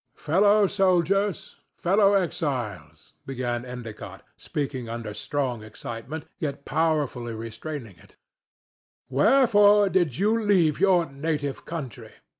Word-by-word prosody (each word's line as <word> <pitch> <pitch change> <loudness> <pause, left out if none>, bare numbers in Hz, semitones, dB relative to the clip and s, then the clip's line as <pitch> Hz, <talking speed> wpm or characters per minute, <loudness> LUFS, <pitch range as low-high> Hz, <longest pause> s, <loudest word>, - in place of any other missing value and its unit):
"Fellow 200 +6 +4
soldiers, 195 0 +1 0.2
fellow 200 +3 +3
exiles," 120 - -3
began 120 -2 -3
Endicott, 125 -3 -9
speaking 135 -5 -4
under 115 -2 -5
strong 130 -1 -3
excitement, 115 +7 -7
yet 140 -4 -4
powerfully 145 -7 -1
restraining 115 - -7
it, - - -21 0.9
"wherefore 205 - +5
did 175 -9 +1
ye 195 - 0
leave 205 -9 +2
your 185 -3 +4
native 145 0 -3
country? 150 - -7
150 Hz, 100 wpm, -25 LUFS, 120-190 Hz, 0.9 s, wherefore